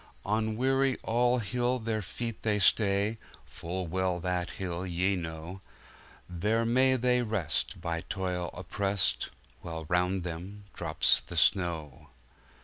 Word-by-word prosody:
On 110 +1 0
Weary 135 +1 +2
All 120 +2 +2
Hill 120 +3 0
their 110 -2 -2
feet 115 +4 -5
they 105 -2 +1
stay 100 +1 +3 0.3
(Full 90 +2 -5
well 90 +1 0
that 90 0 -1
Hill 90 -2 -4
ye 95 +2 +1
know);There 90 +4 -5
may 130 +3 +4
they 125 0 +2
rest, 105 -9 -1
by 85 -1 -2
toil 90 -3 -2
oppressed, 100 -1 0 0.3
While 80 -2 -6
round 90 +1 +1
them 90 +4 -6
drops 80 -2 +3
the - - -8
snow. 80 -7 +1
95 Hz, 125 wpm, -30 LUFS, 90-115 Hz, 0.3 s, may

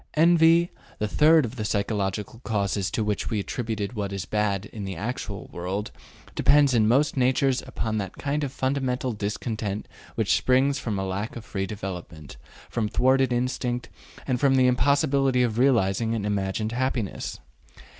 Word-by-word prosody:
Envy, 165 +1 +5 0.3
the 105 - -1
third 155 +6 +5
of 120 +3 -7
the 110 - -2
psychological 105 0 -2
causes 100 -3 -1
to 110 - -1
which 105 -1 -1
we 110 - -1
attributed 110 0 -3
what 100 -3 -3
is 100 -2 -4
bad 105 -2 0
in 105 - -6
the 95 -1 -4
actual 115 +9 -5
world, 95 +4 -3 0.4
depends 145 -2 +4
in 110 -3 +4
most 140 +6 +3
natures 130 0 +2
upon 110 -4 -2
that 95 -2 -5
kind 145 +2 -1
of 140 - -2
fundamental 130 -2 -1
discontent 105 0 -3 0.3
which 110 -5 +2
springs 130 +7 +2
from 110 -4 -3
a 95 - -2
lack 100 +4 -3
of 115 -2 -8
free 95 -2 -3
development, 90 -7 -7 0.3
from 110 -3 -2
thwarted 130 +2 +3
instinct, 125 0 -1 0.4
and 125 -2 0
from 135 0 +4
the 130 -1 +4
impossibility 135 0 +3
of 115 -1 -1
realizing 115 -3 +2
an 105 -3 -2
imagined 100 +1 -1
happiness. 125 -4 -2
115 Hz, 160 wpm, -25 LUFS, 100-130 Hz, 0.4 s, Envy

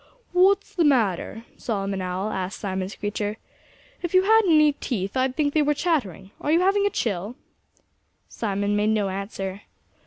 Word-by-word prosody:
"What's 385 +2 +3
the 345 - +2
matter?" 225 - +1
Solomon 195 -3 -2
Owl 185 +3 -2
asked 190 +1 -4
Simon 190 -2 -3
Screecher. 205 0 -3 0.6
"If 350 +1 -3
you 370 - +6
had 445 +3 +6
any 305 -3 +5
teeth 200 -7 -4
I'd 260 0 +1
think 290 -2 0
they 310 - +3
were 295 0 +2
chattering.... 205 - -1
Are 295 - 0
you 335 +2 +4
having 400 +2 +3
a - - +1
chill?" 210 - -2 0.9
Simon 205 -1 -2
made 210 +1 +2
no 210 -2 +1
answer. 195 0 -5
220 Hz, 160 wpm, -24 LUFS, 195-305 Hz, 0.9 s, you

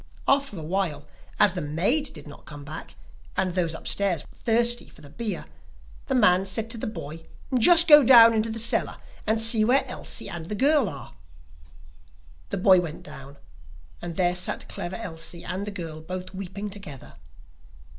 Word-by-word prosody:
After 275 -7 +1
a 160 - -7
while, 160 -4 -2 0.3
as 205 -4 +5
the 180 - -4
maid 190 - 0
did - - -12
not 145 - -14
come 145 -1 -9
back, 155 +3 -9 0.4
and 185 -2 0
those 170 -3 -1
upstairs 185 -2 0
were - - -20
thirsty 240 +1 0
for - - -17
the 145 -2 -13
beer, 225 +5 -5 0.6
the 265 - 0
man 190 -5 +4
said 225 +3 -2
to 235 - -3
the - - -4
boy: 160 -6 -8 0.3
'Just 335 +8 +7
go 300 -2 +9
down 230 -2 +8
into 220 0 0
the 225 - -5
cellar 230 +1 0 0.3
and 220 +1 +1
see 225 -1 +4
where 255 +5 +3
Elsie - - -5
and 165 -1 -6
the 210 - -4
girl 275 -1 +3
are.' - - -10 1.4
The 200 - -3
boy 185 -1 +5
went 165 -3 -7
down, 140 -1 -12 0.6
and 175 -1 -6
there 175 0 +1
sat 180 0 -4
Clever 175 +1 -5
Elsie 170 -4 -7
and 195 +3 -4
the - - -2
girl 165 -6 -7
both 185 +3 -7
weeping 195 +2 -6
together. 190 -10 -10
190 Hz, 175 wpm, -25 LUFS, 165-225 Hz, 1.4 s, go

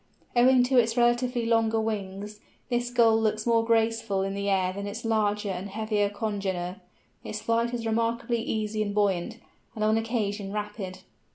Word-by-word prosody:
Owing 250 +1 +6
to 255 0 +4
its 230 0 +1
relatively 240 0 +2
longer 225 -1 +2
wings, 210 -1 -4 0.3
this 240 0 0
Gull 230 -2 +4
looks 215 -1 0
more 230 -1 +3
graceful 225 -3 +1
in 195 0 -2
the 200 0 -2
air 185 -1 +1
than 200 +1 -5
its 220 +3 -6
larger 210 -2 +1
and 185 +2 -5
heavier 210 0 0
congener: 195 -4 -3 0.4
its 215 - -5
flight 230 +1 +1
is 240 -2 -4
remarkably 230 +1 0
easy 215 -1 -2
and 205 -1 -2
buoyant, 195 -4 0 0.4
and 215 - -2
on 215 +1 +3
occasion 210 -3 -2
rapid. 210 -2 -5
215 Hz, 165 wpm, -27 LUFS, 200-230 Hz, 0.4 s, Owing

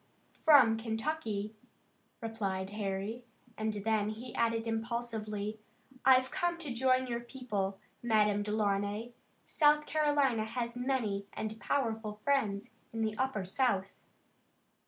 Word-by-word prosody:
"From 260 -8 +6
Kentucky," 220 -2 -2 0.7
replied 200 -4 -3
Harry, 205 +3 -3 0.3
and 220 0 -1
then 210 0 0
he 230 +3 -7
added 230 -1 +1
impulsively: 225 -2 -3 0.4
"I've 255 0 +5
come 350 -2 0
to 305 -7 -5
join 255 +1 +3
your 235 -2 -2
people, 235 -6 -3 0.2
Madame 210 -3 +3
Delaunay. 205 +1 0 0.3
South 300 -1 +4
Carolina 290 -8 +2
has 235 +1 -3
many 245 -6 -1
and 220 +1 -4
powerful 225 -6 -1
friends 220 -9 +1 0.2
in 225 -1 -2
the 215 -1 -1
Upper 260 -7 0
South." 195 -2 +1
225 Hz, 115 wpm, -32 LUFS, 210-255 Hz, 0.7 s, From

